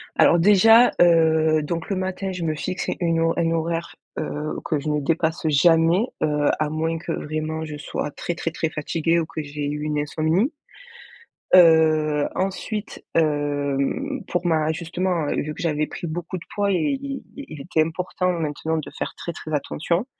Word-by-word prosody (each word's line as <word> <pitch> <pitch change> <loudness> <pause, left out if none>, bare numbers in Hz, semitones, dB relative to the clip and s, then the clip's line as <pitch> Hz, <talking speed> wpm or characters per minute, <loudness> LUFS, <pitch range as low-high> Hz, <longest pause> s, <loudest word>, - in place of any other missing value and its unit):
Alors 170 - +5
déjà, 225 +6 +6
heu, 160 -2 +4
donc 165 +2 -4
le 195 - 0
matin 190 +1 -3
je 180 -2 -5
me 155 -1 -1
fixe 180 +4 -4
une 165 -2 +1
ho 165 0 +2
une 165 -1 +1
horaire, 165 +1 -2 0.2
heu, 150 +1 -3
que 155 - 0
je 150 +2 -4
ne 150 - +1
dépasse 160 +2 0
jamais, 165 - +4 0.2
heu, 150 -1 +2
à 155 -1 0
moins 160 +1 -1
que 165 +1 -5
vraiment 155 +1 -3
je 150 -1 -6
sois 145 0 -4
très, 175 - -4
très, 165 - -3
très 160 -1 -2
fatiguée 165 +2 0
ou 165 - -1
que 160 - -5
j'ai 145 0 -4
eu 150 0 -4
une 150 -1 -1
insomnie. 160 - 0 1.0
Heu, 155 -4 +5
ensuite, 200 +3 -4
hem, 145 - 0
pour 175 0 -2
ma 160 -2 +2
justement, 170 -1 -2
heu, - - -1
vu 150 +1 -5
que - - -10
j'avais 155 -2 0
pris - - -7
beaucoup 175 +3 -4
de 170 - -12
poids 200 -1 +1
et 275 +9 0
il 275 -1 -5
il 160 - -9
était 160 +2 +1
important 180 +3 -1
maintenant 160 -1 -2
de 155 - -6
faire - - -3
très, 170 - -5
très 155 -1 -8
attention. 170 - -1
165 Hz, 180 wpm, -23 LUFS, 155-175 Hz, 1.0 s, déjà